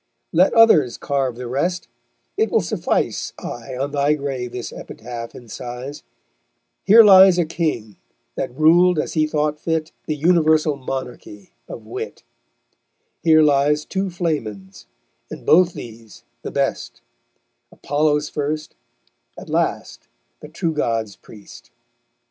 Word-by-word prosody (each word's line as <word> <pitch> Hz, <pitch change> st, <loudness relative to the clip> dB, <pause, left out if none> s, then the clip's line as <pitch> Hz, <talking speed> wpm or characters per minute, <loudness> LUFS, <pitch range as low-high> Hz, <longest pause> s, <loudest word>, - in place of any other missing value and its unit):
Let 180 Hz, +4 st, +4 dB
others 170 Hz, -, +5 dB
carve 135 Hz, -4 st, -2 dB
the 125 Hz, +1 st, -7 dB
rest; 170 Hz, +9 st, -2 dB, 0.5 s
it 440 Hz, +1 st, +1 dB
will -, -, +2 dB
suffice -, -, -2 dB
I 130 Hz, -2 st, -7 dB
on 140 Hz, +2 st, -3 dB
thy 145 Hz, +1 st, +1 dB
grave 135 Hz, -4 st, -4 dB
this 125 Hz, -1 st, -6 dB
epitaph 115 Hz, 0 st, -8 dB
incise: 125 Hz, +3 st, -8 dB, 0.8 s
Here 225 Hz, +3 st, +8 dB
lies 190 Hz, -3 st, +7 dB
a 175 Hz, -, +2 dB
King, 150 Hz, -, -3 dB, 0.4 s
that -, -, -4 dB
ruled 175 Hz, +3 st, +5 dB
as -, -, -2 dB
he 155 Hz, -1 st, +1 dB
thought 150 Hz, 0 st, -1 dB
fit 160 Hz, -1 st, -2 dB, 0.2 s
The 155 Hz, -, -1 dB
universal 155 Hz, -1 st, +2 dB
monarchy 125 Hz, -7 st, -7 dB, 0.2 s
of -, -, -9 dB
wit; -, -, -7 dB, 1.0 s
Here 155 Hz, -1 st, +5 dB
lies 150 Hz, +1 st, +2 dB
two 195 Hz, 0 st, -2 dB
Flamens, 110 Hz, -, -4 dB, 0.4 s
and -, -, -10 dB
both 175 Hz, +1 st, +4 dB
these 115 Hz, -2 st, -11 dB, 0.2 s
the -, -, -6 dB
best, -, -, -3 dB, 0.7 s
Apollo's 150 Hz, +1 st, 0 dB
first, 150 Hz, +1 st, -4 dB, 0.6 s
at -, -, -10 dB
last -, -, -2 dB, 0.3 s
the 150 Hz, -, -11 dB
True 170 Hz, 0 st, -2 dB
God's 115 Hz, -8 st, -2 dB
priest_. 105 Hz, -2 st, -15 dB
150 Hz, 125 wpm, -20 LUFS, 125-165 Hz, 1.0 s, Here